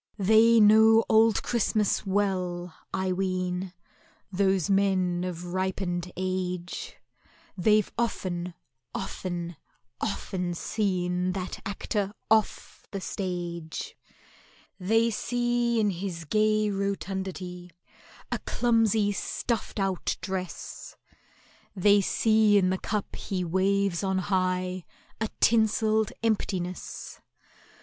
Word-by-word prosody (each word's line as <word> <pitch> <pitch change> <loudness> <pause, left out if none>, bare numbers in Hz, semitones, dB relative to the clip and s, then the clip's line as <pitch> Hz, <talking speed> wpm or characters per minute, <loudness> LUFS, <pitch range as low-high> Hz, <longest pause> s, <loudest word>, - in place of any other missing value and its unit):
They 220 +3 +5
know 220 +1 +7
Old 220 0 +4
Christmas 215 -3 +1
well, 185 -3 -1 0.2
I 190 -1 -1
ween, 185 0 -1 0.6
Those 190 -2 +2
men 190 -3 +2
of 175 -1 -5
ripened 185 -1 -2
age; 180 -1 -3 0.6
They've 210 +2 +3
often, 180 -6 -2 0.4
often, 175 -3 -4 0.4
often 180 -4 -2
seen 180 -2 -1
That 185 -1 -4
Actor 200 0 -2 0.2
off 220 -2 +1
the 195 - -4
stage! 175 -4 -4 0.8
They 225 +5 +2
see 240 +1 0
in 210 -2 +2
his 175 -2 -5
gay 215 +3 +2
rotundity 190 -2 -4 0.6
A - - -1
clumsy 225 -3 +2
stuffed 220 +2 -3
out 195 -2 -1
dress— 185 -1 -6 0.8
They 205 +2 +5
see 215 +1 +4
in 185 -2 +3
the 190 - -1
cup 210 -2 -3
he 185 -2 -3
waves 190 +1 +1
on 190 -1 0
high 185 -1 0 0.4
A 220 -1 -1
tinselled 220 -1 +3
emptiness. 185 -5 -2
190 Hz, 95 wpm, -27 LUFS, 180-215 Hz, 0.8 s, know